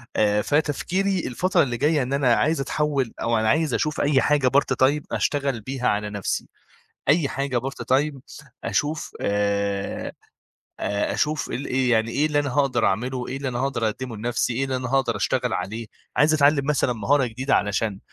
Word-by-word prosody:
آآ 105 0 +3
فتفكيري 175 - 0
الفترة 180 +7 +2
اللي 120 -3 -2
جاية 150 0 +2
إن 130 +2 -3
أنا 130 -4 +3
عايز 155 -1 +1
أتحوِّل 140 -4 -1
أو 115 -1 +1
أنا 110 0 +1
عايز 155 -1 +2
أشوف 150 0 0
أي 140 -2 +3
حاجة 145 -3 +2
part 135 0 +2
time 150 +2 0
أشتغل 140 -5 0
بيها 130 +2 -3
على 105 0 0
نَفْسي. 100 -2 -3 0.6
أي 150 -1 +4
حاجة 135 -2 -1
part 135 +3 -5
time 145 -1 -1 0.4
أشوف 150 +1 -1
آآ 100 -1 -1 0.7
آآ 100 0 -1
أشوف 155 +1 -1
ال 135 +4 -3
إيه 130 -1 +1
يعني 110 0 +2
إيه 150 +5 +1
اللي 150 -1 +1
أنا 140 -2 0
هاقدر 140 0 +2
أعمله، 125 +5 -1
إيه 135 - -4
اللي 135 -1 -3
أنا 120 -1 -3
هاقدر 130 -4 0
أقدِّمه 120 +1 -5
لنَفْسي، 120 +2 -1
إيه 135 +3 0
اللي 130 -1 -2
أنا 125 -1 -4
هاقدر 130 -4 +1
أشتغل 125 +3 0
عليه؟ 110 +5 -3 0.3
عايز 155 +1 +4
أتعلِّم 145 -1 +3
مثلًا 140 -4 +1
مهارة 130 +5 +2
جديدة 130 +4 -1
علشان 105 0 -1
130 Hz, 180 wpm, -24 LUFS, 115-145 Hz, 0.7 s, أي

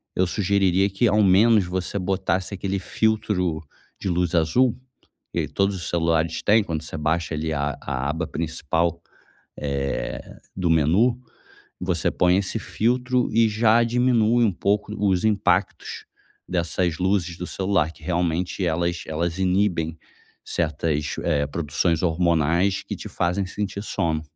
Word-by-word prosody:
eu 95 - +2
sugeriria 95 0 +2
que 100 +5 +2
ao 105 0 +3
menos 100 +2 +5
você 90 +2 -3
botasse 95 +1 -1
aquele 100 0 -2
filtro 95 -6 0 0.4
de 95 - -2
luz 90 0 0
azul 110 +10 +2 0.6
que - - -1
todos 100 0 0
os 90 - -5
celulares 80 -1 +1
têm, 105 +1 +4
quando 80 -5 -3
você 80 0 -7
baixa 80 +2 -1
ali 80 +1 -2
a 70 -1 -2
a 70 +3 -2
aba 80 +1 -2
principal, 85 +1 -1 0.6
eh, 70 -1 -2 0.3
do 90 -3 -1
menu, 85 - +3 0.6
você 90 -2 0
põe 90 +1 +3
esse 100 -1 -1
filtro 125 +2 0
e 115 -1 +4
já 110 +2 +4
diminui 120 -1 +3
um 105 - +2
pouco 105 +3 0
os 95 -1 +1
impactos 95 -4 0 0.4
dessas 85 -1 -1
luzes 90 -3 0
do 90 - -5
celular, 95 -5 0
que - - -19
realmente 90 +1 -1
elas 85 +1 -1
elas 85 +2 -2
inibem 90 -4 +1 0.5
certas, 75 -2 -1
eh, 70 -1 +1
produções 80 +2 -1
hormonais 85 +2 +2
que - - -5
te - - -8
fazem 90 +3 -1
sentir 100 +1 -4
sono. 80 -6 -1
90 Hz, 140 wpm, -23 LUFS, 80-100 Hz, 0.6 s, menos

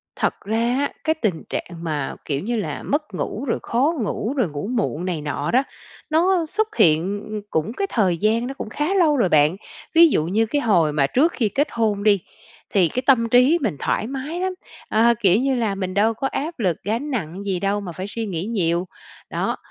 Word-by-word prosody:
Thật - - 0
ra 230 +3 +1
á, 285 - 0
cái 315 0 +1
tình 210 - -2
trạng 175 - -4
mà, 150 -4 -2
kiểu 140 -2 -1
như 235 +4 -2
là, 210 - -3
mất 295 -6 -2
ngủ 220 +8 -3
rồi 230 - -1
khó 270 +8 +1
ngủ, 220 +4 -2
rồi 220 -10 +1
ngủ 145 +6 -5
muộn 210 -8 -1
này 170 -5 -2
nọ 145 0 -2
đó, 260 +3 +4 0.5
nó 340 +2 +3
xuất 430 +5 -2
hiện, 180 +6 +2
ư, 215 -1 -4
cũng 160 +9 -1
cái 395 +6 -2
thời 185 -7 +1
gian 225 +5 +1
nó 270 - -4
cũng 220 - -7
khá 300 - -1
lâu 320 -7 +3
rồi 195 -7 +2
bạn. 150 +3 +4 0.4
Ví 335 0 +9
dụ 155 - +1
như 215 +6 +1
cái 290 +6 -1
hồi 170 -10 +3
mà 140 -2 +2
trước 310 - +3
khi 220 -4 0
kết 290 +7 +1
hôn 215 -3 0
đi, 205 -2 +4 0.5
thì 185 -4 +4
cái 250 +9 -2
tâm 230 -4 +4
trí 250 +8 +5
mình 215 - -1
thoải 215 - -1
mái 275 +6 -4
lắm, 375 0 -1 0.4
ờ, 230 +2 +4
kiểu 190 -2 +5
như 270 -1 +1
là, 220 -5 0
mình 185 -1 -3
đâu 215 +3 +3
có 270 +5 -2
áp 305 +2 -4
lực, 180 -7 +1
gánh 235 +8 -2
nặng 190 -4 -4
gì 190 -3 -1
đâu 200 +1 0
mà 180 -3 -6
phải 185 +4 -6
suy 225 +2 -4
nghĩ 180 -3 -3
nhiều. 180 -5 0 0.4
Đó, - - -2
220 Hz, 220 wpm, -22 LUFS, 185-270 Hz, 0.5 s, Ví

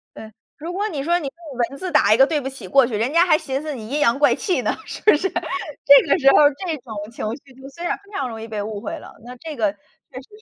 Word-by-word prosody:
对。 220 0 -10 0.2
如 335 +4 -6
果 410 +3 -2
你 285 -7 -4
说 345 +3 +1
你 300 - -5
用 290 -3 -10
文 275 - -10
字 370 -1 -4
打 215 -8 +4
一 - - +3
个 265 - +7
“对 300 -2 -1
不 265 - -4
起” 260 -8 -10
过 265 +4 +5
去， 235 - -6
人 235 +7 -1
家 340 +2 +4
还 310 - +5
寻 270 -2 -4
思 305 -2 -5
你 220 -3 -8
阴 290 +3 -2
阳 235 -1 +3
怪 295 - +4
气 355 - -1
呢， 215 - 0
是 - - -8
不 430 - +6
是？ 385 +6 -1
这 295 -7 +2
个 - - +3
时 275 -2 +5
候 - - +5 0.3
这 325 -3 -2
种 240 -4 -10 0.2
情 230 - -6 0.2
绪 270 - -18
就 270 - -10
虽 340 +5 -9
然 - - -1
非 405 +1 -22
常 265 -2 -2
容 225 -1 -8
易 225 - -7
被 215 -2 -4
误 210 -1 -5
会 - - -5
了。 - - -12
那 250 +1 -9
这 310 +2 -8
个 210 -3 +1
确 - - -27 0.5
实 - - -23
275 Hz, 315 characters per minute, -21 LUFS, 235-325 Hz, 0.5 s, 个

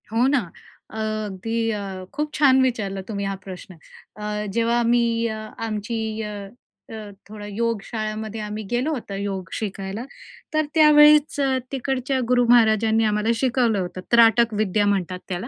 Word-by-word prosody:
हो 230 +3 +2
ना. 275 0 +3 0.5
अ, - - -8 0.3
अगदी 225 +4 -2
अ, 195 -3 -5
खूप 300 +1 -3
छान 265 -3 +4
विचारलं 210 -7 -1
तुम्ही 200 -2 -3
हा 195 0 -2
प्रश्न. 185 -1 -9 0.4
अ, 210 0 -4
जेव्हा 235 +1 +1
आम्ही 235 -1 +2 0.4
आमची 220 +1 -3 0.2
अ, 210 -1 -5 0.6
अ, 215 -2 -8 0.2
थोडा 210 -1 -9
योग 225 +1 -2
शाळेमध्ये 215 0 -4
आम्ही 210 +1 -5
गेलो 250 +6 0
होतं 235 -9 -5
योग 195 -3 -4
शिकायला, 195 +1 -4 0.5
तर 310 0 +2
त्यावेळीच 300 -1 +6 0.3
तिकडच्या 265 0 -1
गुरु 245 0 +3
महाराजांनी 225 -1 +4
आम्हाला 210 +1 0
शिकवलं 240 -4 +1
होतं 185 0 -5
त्राटक 235 0 +5
विद्या 205 -1 +1
म्हणतात 185 -3 -1
त्याला. 185 +5 -4
220 Hz, 145 wpm, -23 LUFS, 205-240 Hz, 0.6 s, त्यावेळीच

